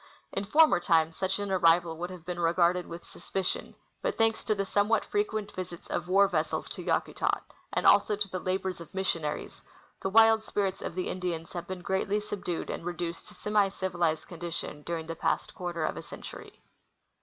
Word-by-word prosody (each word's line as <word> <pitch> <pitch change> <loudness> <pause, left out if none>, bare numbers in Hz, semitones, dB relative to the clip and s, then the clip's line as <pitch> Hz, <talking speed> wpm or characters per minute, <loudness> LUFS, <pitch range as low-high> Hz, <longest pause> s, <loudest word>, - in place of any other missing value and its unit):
In 195 - -2
former 305 - +6
times 165 -2 +3
such 190 0 0
an 205 -1 -3
arrival 170 -2 +4
would 175 +1 -3
have 180 -3 -10
been 175 0 -4
regarded 175 +1 +3
with 170 +1 -8
suspicion; 190 -1 -3 0.3
but - - -1
thanks 225 0 +2
to 215 - +2
the 195 -1 -1
somewhat 205 +3 +2
frequent 220 - -1
visits 180 -2 -6
of 175 - -1
war 195 +2 +5
vessels - - -1
to - - -5
Yakutat, - - 0 0.3
and - - -1
also 205 +1 +6
to 205 0 -1
the 185 -1 -4
labors 185 -1 -2
of 170 - -12
missionaries, 170 -6 -2 0.4
the 190 - 0
wild 225 +1 +6
spirits 195 -3 -1
of 170 - -5
the 185 - -1
Indians 175 -3 -3
have 175 -1 -5
been 185 -1 -5
greatly 190 +2 +1
subdued 200 -5 -4
and - - -5
re 175 +1 -3
duced 170 -1 -4
to - - -13
semi 210 -1 +2
civilized 175 -5 -1
condition 170 -3 -5
during 165 -1 -2
the 165 0 -5
past - - 0
cjuarter 170 -3 -2
of - - -3
a - - -4
century. - - -10
185 Hz, 190 wpm, -29 LUFS, 170-200 Hz, 0.4 s, former